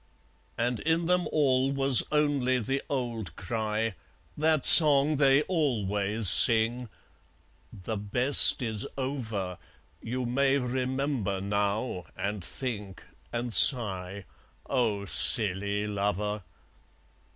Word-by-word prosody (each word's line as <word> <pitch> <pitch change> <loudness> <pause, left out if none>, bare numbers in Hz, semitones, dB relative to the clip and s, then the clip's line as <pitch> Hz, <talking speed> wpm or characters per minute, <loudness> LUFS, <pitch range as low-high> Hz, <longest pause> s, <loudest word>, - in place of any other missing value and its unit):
And 120 0 -4
in 165 +2 -3
them 180 +1 -2
all 135 -3 -1
was 135 -2 +2
only 145 -4 -2
the 135 +4 -5
old 120 -7 -7
cry, 110 +2 -5 0.4
That 155 -1 -1
song 150 -2 +9
they 140 +1 +1
always 110 - -3
sing 115 +3 +4 0.8
"The 105 +3 -9
best 125 +7 +2
is 110 +1 -5
over! 110 - -7 0.4
You 125 +2 -7
may 135 +3 -1
remember 130 -4 -5
now, 100 0 -5
and 100 -2 -6
think, 105 -5 -8 0.3
and 120 0 -6
sigh, 100 -7 +2 0.4
O 110 -7 -3
silly 100 -1 +1
lover!" 105 0 -5
120 Hz, 100 wpm, -25 LUFS, 105-135 Hz, 0.8 s, song